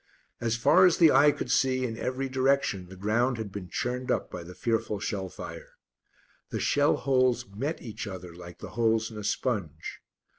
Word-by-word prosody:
As 115 -1 0
far 185 +10 +6
as 175 - +2
the 165 -3 +7
eye 145 - +6
could 125 - -4
see 130 -1 +2
in 115 -2 -3
every 130 +3 -2
direction 130 -8 +1
the 95 - -10
ground 115 +6 +1
had 110 -3 -5
been 95 -3 -7
churned 125 +5 -3
up - - 0
by - - -6
the 90 +2 -10
fearful 110 -3 -1
shell 95 -2 -3
fire. - - -9 0.8
The - - -3
shell 145 0 +3
holes 130 -2 +2
met 150 +8 -3
each 110 -2 -6
other 90 -3 -7
like 90 0 -11
the - - -8
holes 115 0 +1
in 110 - -7
a - - -6
sponge. 100 - -2
115 Hz, 190 wpm, -28 LUFS, 100-130 Hz, 0.8 s, the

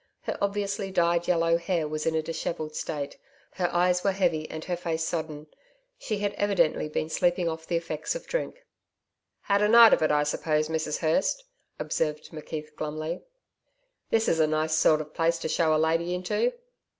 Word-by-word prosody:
Her - - -3
obviously 200 0 -1
dyed 170 -2 +1
yellow 165 -1 +3
hair 170 -3 -1
was 155 +1 -3
in 160 - +1
a 160 - 0
dishevelled 155 -1 -4
state, 145 -3 -4 0.3
her 180 -2 -1
eyes 180 +1 +2
were 195 - +2
heavy 170 -5 0
and 160 0 -6
her 180 - -1
face 165 -2 -2
sodden. 155 -2 -4 0.5
She 215 - -3
had 205 0 -1
evidently 175 -7 +1
been 155 - -2
sleeping 175 +2 +1
off 160 0 -4
the 170 - -1
effects 165 - -2
of - - -6
drink. - - -4 0.8
'Had 200 0 +1
a 210 - +4
night 230 +1 +8
of - - +3
it, 155 - +3
I 150 0 +3
suppose, 155 +1 0
Mrs 160 -1 -1
Hurst?' 175 - +1 0.3
observed 150 -1 -2
McKeith 155 -1 -7
glumly. 155 +3 -4 0.9
'This 225 0 +2
is 165 - +2
a 155 - +4
nice 155 +1 0
sort 155 0 +4
of 155 0 -10
place 165 0 +1
to 165 - -4
show 160 -1 +2
a - - +3
lady 165 +3 +1
into.' 210 - 0
165 Hz, 185 wpm, -27 LUFS, 155-180 Hz, 0.9 s, night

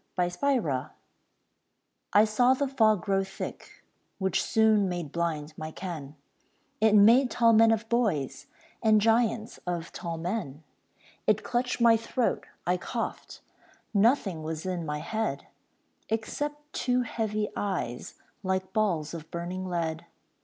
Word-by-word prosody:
THE 175 -1 +1
FOG 175 - 0 1.2
I 205 +2 +6
saw 245 +4 +3
the 280 +1 0
fog 220 -7 +3
grow 195 -2 +1
thick, 190 - -8 0.3
Which 190 -2 0
soon 215 -3 +3
made 175 -5 -4
blind 160 -3 -2
my 155 0 -4
ken; 160 -5 -7 0.6
It 220 -1 +4
made 235 +6 +6
tall 235 -1 +4
men 225 +1 +6
of 225 0 +1
boys, 215 - 0 0.3
And 220 -2 +5
giants 225 +1 +1
of 170 -2 -3
tall 170 -2 -5
men. 165 -4 -4 0.6
It 215 0 +3
clutched 250 +1 -1
my 230 -1 +6
throat, 230 +2 -1 0.2
I 180 +1 +2
coughed; 230 +5 -5 0.5
Nothing 205 - +2
was 160 +1 -5
in 180 -3 -3
my 150 0 -3
head 215 -10 -2 0.6
Except 260 +7 -2 0.2
two 250 0 +1
heavy 215 -2 -2
eyes 185 -12 -3 0.3
Like 190 -1 -2
balls 175 -9 0
of 160 -1 -8
burning 180 +2 -4
lead. 165 -3 -3
200 Hz, 130 wpm, -28 LUFS, 170-225 Hz, 1.2 s, I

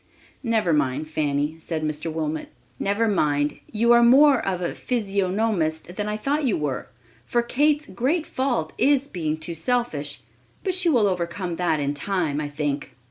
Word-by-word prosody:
"Never 225 - +1
mind, 145 0 0
Fanny," 150 0 -1
said 160 -1 -4
Mr. 155 +1 -2
Wilmot; 155 -1 -3 0.3
"never 205 +3 +1
mind; 150 -7 +1
you 235 +2 +3
are 240 0 +7
more 270 +2 +6
of 185 -2 -1
a 175 - -2
physiognomist 195 -6 -1
than 210 +1 -2
I 210 - -2
thought 285 +7 0
you 225 - +1
were, 145 -4 -3 0.4
for 240 - 0
Kate's 295 +4 +2
great 275 - -1
fault 245 - -1
is 275 +2 +3
being 160 - -2
too 160 +2 -6
selfish; 160 - -1 0.4
but 375 - 0
she 365 -1 +2
will 240 -9 +4
overcome 180 -1 -2
that 175 -4 +1
in 145 0 0
time, 155 -2 -1
I 145 - -3
think." 145 -2 -3
180 Hz, 165 wpm, -24 LUFS, 155-235 Hz, 0.4 s, are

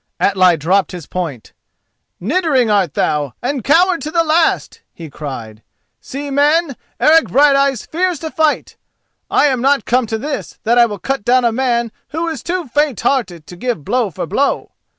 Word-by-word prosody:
Atli 185 -3 +3
dropped 185 +6 +1
his 175 -4 -7
point. 160 -11 -5 0.7
"Niddering 260 - +1
art 195 -7 +1
thou, 145 -3 0
and 260 0 -3
coward 350 - +3
to 305 - -4
the 335 +1 +2
last!" 320 +1 +1
he 160 -3 -11
cried. 115 -8 -7 0.4
"See, 280 +1 -7
men, 295 +1 +2 0.2
Eric 320 +1 +5
Brighteyes 275 -2 +3
fears 360 +1 -1
to 320 -1 -5
fight. 315 -1 0 0.5
I - - +3
am 260 -4 +1
not 275 -2 +2
come 250 -1 +1
to 220 - -2
this 285 +5 -5
that 235 +2 +3
I 235 - +6
will 205 -2 -6
cut 270 +3 -3
down 250 +2 +3
a 235 - +3
man 235 -1 0 0.2
who 325 +3 -3
is 315 -6 -5
too 355 0 -3
faint 285 0 0
hearted 185 - -1
to 180 - -11
give 205 - -3
blow 245 -4 0
for 170 - -5
blow. 240 +12 -1
255 Hz, 175 wpm, -17 LUFS, 190-295 Hz, 0.7 s, I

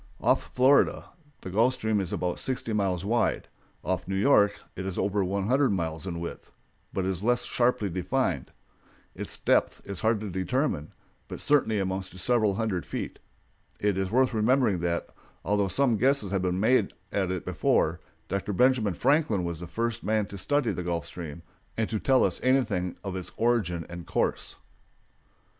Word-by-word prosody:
Off - - +1
Florida 130 +3 +3 0.3
the 95 - -7
Gulf 115 +6 +3
Stream 110 -3 0
is 95 - -4
about 90 -1 -2
sixty 125 -3 -2
miles 95 -3 0
wide; 115 +1 +1 0.4
off - - -2
New 95 - -2
York 105 -1 +4 0.2
it 95 - -4
is 95 -1 -4
over 100 0 +1
one 95 +1 -1
hundred 135 +2 +3
miles 80 -1 -3
in 85 -2 -3
width, 85 - -7 0.4
but 95 - -2
is 95 -2 -2
less 120 +3 +2
sharply 120 -4 +1
defined. 90 -1 -1 0.6
Its - - -4
depth - - +2
is 100 -2 -5
hard 110 -1 +2
to 105 -2 -5
determine, 95 - -1 0.4
but - - -7
certainly 115 -8 +2
amounts 95 -1 -2
to - - -13
several 110 0 +2
hundred 100 -5 -1
feet. - - -5 0.6
It 105 -2 +1
is 95 0 -1
worth 130 +3 +3
remembering 110 -3 +2
that, 85 0 -1 0.4
although 100 +1 +2
some 120 +4 +2
guesses 130 -4 +2
had 95 -2 +1
been 90 0 0
made 110 0 +3 0.2
at 95 -2 0
it 90 -2 -3
before, - - +1 0.3
Dr. 100 +2 -2
Benjamin 115 -3 +3
Franklin 140 - +2
was 85 -2 -4
the 90 - -7
first 115 +5 -2
man 110 -1 +1
to 100 - -7
study 145 +1 +1
the - - -3
Gulf 85 -3 -2
Stream 85 -1 -8 0.3
and 110 -1 +1
to 110 - 0
tell 130 +3 +3
us - - 0
anything 120 -9 +1
of 95 -2 -4
its 90 -1 -5
origin 105 -9 +1
and 85 -1 -8
course. - - -1
100 Hz, 175 wpm, -27 LUFS, 90-120 Hz, 0.6 s, York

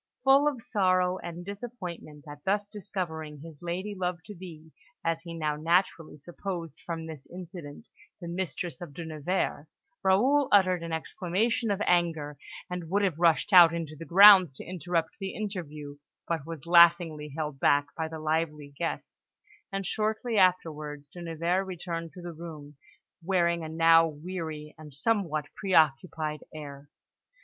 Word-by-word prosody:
Full 275 +2 +6
of 260 -6 -2
sorrow 185 -3 +2
and 175 +1 -7
disappointment 185 -8 -8
at 145 0 -10
thus 205 +2 +1
discovering 170 -8 -5
his 160 -2 -12
lady 180 +4 -3
love 180 -2 -2
to 210 - -9
be, 165 -4 -11 0.3
as 165 0 0
he 170 -1 -8
now 155 -2 -1
naturally 165 0 +1
supposed 170 0 -6
from 165 -2 -4
this 155 -4 -9
incident, 175 +1 -9 0.3
the 175 - -7
mistress 175 -1 -4
of 155 -5 -9
De 170 - -6
Nevers, 155 -1 -2 0.4
Raoul 250 +9 +4
uttered 185 -3 +4
an 170 0 -5
exclamation 195 +8 -1
of 200 0 0
anger, 160 -5 +1 0.3
and 180 -2 -5
would 200 +3 +1
have 175 -5 0
rushed 170 +4 +3
out 170 -2 +9
into 160 -2 -5
the 160 - -9
grounds 190 -1 +9
to - - -10
interrupt 170 -1 -2
the 195 -1 -5
interview, 155 -9 -6 0.3
but 165 -3 -2
was 165 -4 -7
laughingly 170 -4 +5
held 150 -3 -3
back 145 +1 +4
by 160 -1 -2
the 160 0 -7
lively 155 -2 -2
guests; 170 +3 -6 0.3
and 195 0 -3
shortly 220 +4 -1
afterwards 155 -6 +1
De 175 - -9
Nevers 170 +3 -1
returned 170 -2 -5
to 180 - -11
the 175 -1 -6
room, 155 -3 -9 0.5
wearing 170 -2 +1
a 160 - -5
now 165 0 +5
weary 155 -1 -6
and 150 -3 -12
somewhat 160 -4 0
preoccupied 155 -3 +1
air. 145 -2 -9
170 Hz, 155 wpm, -28 LUFS, 155-185 Hz, 0.5 s, out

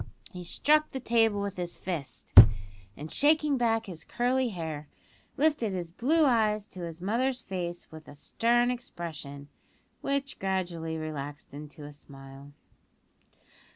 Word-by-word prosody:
He 180 -3 -8
struck 305 - +2
the 265 - -5
table 225 -4 +2
with 200 -1 -4
his 175 -1 -4
fist, 165 -7 -6 0.6
and, 155 +2 -7
shaking 300 0 +3
back 225 -2 +1
his 175 -6 -7
curly 250 +1 0
hair, 160 -6 -5 0.5
lifted 285 -8 +2
his 175 -3 -4
blue 305 - +2
eyes 215 -5 +2
to 185 - -11
his 165 -1 -6
mother's 245 +6 0
face 175 -2 -5
with 155 -1 -12
a - - -11
stern 240 +10 +2
expression, 155 - -7 0.5
which 275 0 -2
gradually 175 -4 -2
relaxed 145 -3 -6
into 150 +1 -9
a 145 - -9
smile. 135 -1 -13
185 Hz, 135 wpm, -29 LUFS, 155-240 Hz, 0.6 s, shaking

